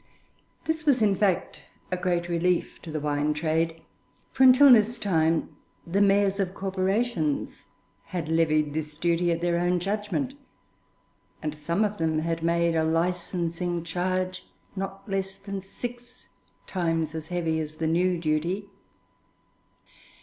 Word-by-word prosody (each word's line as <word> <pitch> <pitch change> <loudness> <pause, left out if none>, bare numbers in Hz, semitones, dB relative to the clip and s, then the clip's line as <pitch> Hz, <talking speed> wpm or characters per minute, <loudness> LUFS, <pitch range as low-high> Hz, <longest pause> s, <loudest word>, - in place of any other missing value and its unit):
This 320 0 -1
was, 255 -5 +4
in 205 -2 +3
fact, 190 -3 0 0.3
a - - +1
great 175 -1 -1
relief 175 +1 0
to 165 - -8
the 155 - -2
wine 150 0 0
trade, 165 +1 -1 0.5
for - - -4
until 260 +1 +9
this 230 +1 +4
time 165 -6 +1 0.3
the 190 +4 +1
mayors 200 0 +3
of 190 -1 -1
corporations 190 -4 -1 0.4
had 175 -4 -4
levied 155 -2 +2
this 150 -1 -4
duty 170 +1 +1
at 170 0 -1
their 170 0 +1
own 175 +1 +2
judgment, 210 +8 -2 1.1
and 155 0 -2
some 170 +7 0
of 210 0 -3
them 160 -1 +1
had 165 +1 -1
made 170 0 +2
a 160 - +2
licensing 170 +1 -1
charge 185 +2 -2 0.3
not 195 0 -5
less 195 -1 -2
than 195 0 -6
six 245 +5 -8 0.4
times 165 -4 -1
as 160 -1 -6
heavy 165 -2 -1
as 155 -1 -5
the 160 - -3
new 175 +3 +2
duty. 170 +5 -1
175 Hz, 140 wpm, -26 LUFS, 160-195 Hz, 1.1 s, until